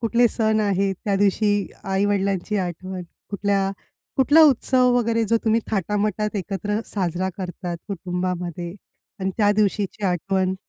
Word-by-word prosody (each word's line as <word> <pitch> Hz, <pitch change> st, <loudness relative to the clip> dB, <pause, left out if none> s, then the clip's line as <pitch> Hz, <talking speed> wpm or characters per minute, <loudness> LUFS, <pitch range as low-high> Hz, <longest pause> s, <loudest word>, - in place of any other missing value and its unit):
कुठले 235 Hz, +1 st, +3 dB
सण 220 Hz, -1 st, +1 dB
आहेत 195 Hz, -1 st, +1 dB
त्या 200 Hz, -, +1 dB
दिवशी 205 Hz, 0 st, +2 dB, 0.2 s
आई-वडिलांची 195 Hz, +1 st, 0 dB
आठवण. 185 Hz, +1 st, -4 dB, 0.3 s
कुठल्या 200 Hz, -1 st, 0 dB, 0.5 s
कुठला 290 Hz, +4 st, +6 dB
उत्सव 255 Hz, -2 st, +4 dB
वगैरे 230 Hz, -1 st, +1 dB
जो 230 Hz, +2 st, +2 dB
तुम्ही 225 Hz, +1 st, +3 dB
थाटामाटात 210 Hz, +1 st, -1 dB
एकत्र 205 Hz, +3 st, -2 dB
साजरा 185 Hz, -1 st, -1 dB
करतात 180 Hz, -2 st, -5 dB
कुटुंबामध्ये 180 Hz, -2 st, -3 dB, 0.5 s
आणि 190 Hz, 0 st, 0 dB
त्या 205 Hz, -2 st, +4 dB
दिवशीची 205 Hz, 0 st, 0 dB
आठवण? 185 Hz, +1 st, 0 dB
200 Hz, 125 wpm, -23 LUFS, 185-215 Hz, 0.5 s, कुठला